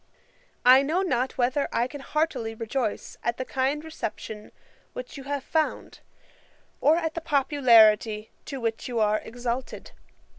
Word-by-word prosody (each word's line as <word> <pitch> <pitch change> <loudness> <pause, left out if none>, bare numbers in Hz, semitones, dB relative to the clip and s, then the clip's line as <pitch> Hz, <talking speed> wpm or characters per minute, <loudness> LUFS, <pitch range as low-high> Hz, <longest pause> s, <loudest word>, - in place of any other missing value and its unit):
'I 255 +2 +8
know 315 +7 0
not 255 -7 -1
whether 260 +3 +1
I 235 - +1
can 285 +2 -9
heartily 270 -7 -2
rejoice 225 0 -3
at 235 - -1
the 255 - -3
kind 270 +4 -1
reception 220 -8 -6 0.4
which - - -8
you 275 -2 -9
have 285 -1 -3
found, 315 +1 -2 0.8
or 310 +3 +4
at 325 -2 -2
the 335 - -4
popularity 235 -8 +4
to 275 -2 -6
which 225 -2 -3
you 240 -2 -2
are 215 0 +2
exalted. 245 +2 -5
260 Hz, 145 wpm, -26 LUFS, 230-290 Hz, 0.8 s, I